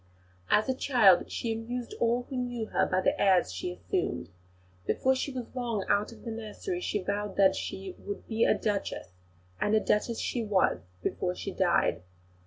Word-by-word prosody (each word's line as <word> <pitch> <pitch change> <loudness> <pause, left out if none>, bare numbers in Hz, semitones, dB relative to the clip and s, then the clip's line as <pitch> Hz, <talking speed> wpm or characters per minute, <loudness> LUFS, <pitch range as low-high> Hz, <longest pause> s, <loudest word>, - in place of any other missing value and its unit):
As 215 - +4
a 260 - +2
child 240 -9 +4
she 230 -1 -1
amused 235 +2 -5
all 235 +1 +2
who 270 - -6
knew 245 -2 -2
her - - +2
by 185 0 +1
the 280 +6 +1
airs 185 - +4
she 90 -1 -3
assumed. 90 0 -2 0.6
Before 265 - +2
she 265 +2 -2
was 250 -3 -6
long 235 -6 -2
out 205 +2 +2
of 230 - -14
the 230 - -3
nursery 230 - -4
she 205 - -1
vowed 200 +1 -2
that 195 -1 +5
"she 190 -1 -5
would 205 - -7
be 225 0 +1
a - - +4
Duchess," 205 -2 -2 0.5
and 210 - +2
a - - +5
Duchess 220 +2 0
she 240 - -1
was 200 - +2 0.2
before 180 0 -1
she 195 - -5
died. 180 -2 +2
220 Hz, 185 wpm, -29 LUFS, 195-245 Hz, 0.6 s, that